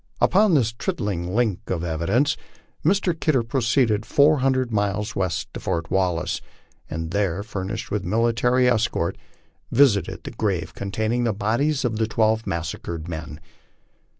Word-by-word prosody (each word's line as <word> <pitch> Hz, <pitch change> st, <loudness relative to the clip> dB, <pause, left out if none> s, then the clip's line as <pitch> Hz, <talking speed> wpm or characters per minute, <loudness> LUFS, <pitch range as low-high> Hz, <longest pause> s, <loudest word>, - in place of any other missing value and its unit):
Upon 195 Hz, -1 st, +4 dB
this 115 Hz, -6 st, +3 dB
trifling 105 Hz, -, -3 dB
link 110 Hz, -6 st, 0 dB
of 85 Hz, -2 st, -1 dB
evidence 90 Hz, -, +1 dB, 0.5 s
Mr. 190 Hz, +1 st, +2 dB
Kidder 155 Hz, -6 st, +1 dB
proceeded 115 Hz, -2 st, +1 dB
four 145 Hz, +7 st, +4 dB
hundred 130 Hz, -2 st, +1 dB
miles 105 Hz, 0 st, -1 dB
west 90 Hz, -5 st, -2 dB
to -, -, -5 dB
Fort 85 Hz, -1 st, -3 dB
Wallace, 90 Hz, -3 st, 0 dB, 0.5 s
and 80 Hz, 0 st, -4 dB
there 100 Hz, -4 st, +1 dB
being -, -, -20 dB
furnished 95 Hz, -3 st, -4 dB
with 105 Hz, -2 st, -1 dB
military 115 Hz, +5 st, +2 dB
escort 110 Hz, -8 st, +1 dB, 0.6 s
visited 120 Hz, -6 st, +3 dB
the -, -, -6 dB
grave 90 Hz, -6 st, -2 dB
containing 110 Hz, +4 st, -1 dB
the 115 Hz, -2 st, +1 dB
bodies 120 Hz, +8 st, 0 dB
of 115 Hz, -3 st, -1 dB
the 110 Hz, 0 st, +1 dB
twelve 110 Hz, 0 st, +1 dB
massacred 85 Hz, 0 st, -4 dB
men. 80 Hz, -3 st, -6 dB
110 Hz, 145 wpm, -23 LUFS, 95-125 Hz, 0.6 s, Upon